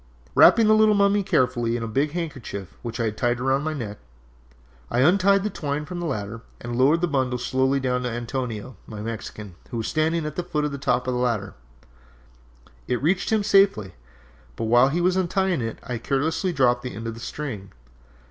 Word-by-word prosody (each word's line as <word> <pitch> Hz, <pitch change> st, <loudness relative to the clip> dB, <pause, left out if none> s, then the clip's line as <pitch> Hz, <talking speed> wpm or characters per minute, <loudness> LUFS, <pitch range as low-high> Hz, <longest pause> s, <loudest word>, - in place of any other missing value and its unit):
"Wrapping 225 Hz, -, +7 dB
the 215 Hz, -, +6 dB
little 215 Hz, -1 st, +5 dB
mummy 200 Hz, 0 st, +3 dB
carefully 125 Hz, -8 st, +1 dB
in 115 Hz, -, -4 dB
a -, -, -3 dB
big 140 Hz, +7 st, 0 dB
handkerchief 135 Hz, -, -5 dB
which 115 Hz, 0 st, -6 dB
I -, -, +1 dB
had 110 Hz, -1 st, -2 dB
tied 120 Hz, -1 st, 0 dB
round 135 Hz, +2 st, +1 dB
my 155 Hz, 0 st, -2 dB
neck, 105 Hz, -7 st, -6 dB, 0.9 s
I 120 Hz, -, +1 dB
untied 195 Hz, +5 st, +4 dB
the 210 Hz, -, -2 dB
twine 150 Hz, -4 st, -3 dB
from 180 Hz, +2 st, -6 dB
the 175 Hz, -, -3 dB
ladder, 110 Hz, -4 st, -4 dB, 0.2 s
and 120 Hz, 0 st, -5 dB
lowered 140 Hz, +7 st, +3 dB
the 175 Hz, -, +2 dB
bundle 130 Hz, -4 st, 0 dB
slowly 130 Hz, +2 st, +1 dB
down 125 Hz, -1 st, 0 dB
to 125 Hz, -, -2 dB
Antonio, 120 Hz, 0 st, -4 dB
my 105 Hz, -, -8 dB
Mexican, 105 Hz, -3 st, -6 dB, 0.2 s
who 120 Hz, -, -5 dB
was 115 Hz, -, -2 dB
standing 160 Hz, +1 st, 0 dB
at 150 Hz, -1 st, -5 dB
the -, -, +1 dB
foot 150 Hz, -4 st, -1 dB
of 150 Hz, -, -2 dB
the 140 Hz, -, -5 dB
top 125 Hz, -, 0 dB
ladder. 125 Hz, -5 st, -1 dB, 1.3 s
It 125 Hz, -, 0 dB
reached 180 Hz, +6 st, +1 dB
him 215 Hz, -2 st, +2 dB
safely, 195 Hz, -, +3 dB, 0.6 s
but -, -, -4 dB
while 120 Hz, +4 st, +5 dB
he 170 Hz, +5 st, 0 dB
was 180 Hz, +1 st, +2 dB
untying 185 Hz, -3 st, +1 dB
it 115 Hz, -1 st, -4 dB
I 120 Hz, 0 st, -4 dB
carelessly 155 Hz, -, 0 dB
dropped 125 Hz, -5 st, +2 dB
the 125 Hz, -3 st, -6 dB
end 115 Hz, +3 st, -7 dB
of 115 Hz, -, -3 dB
the 115 Hz, -, -10 dB
string. 115 Hz, -7 st, -6 dB
130 Hz, 200 wpm, -24 LUFS, 115-165 Hz, 1.3 s, Wrapping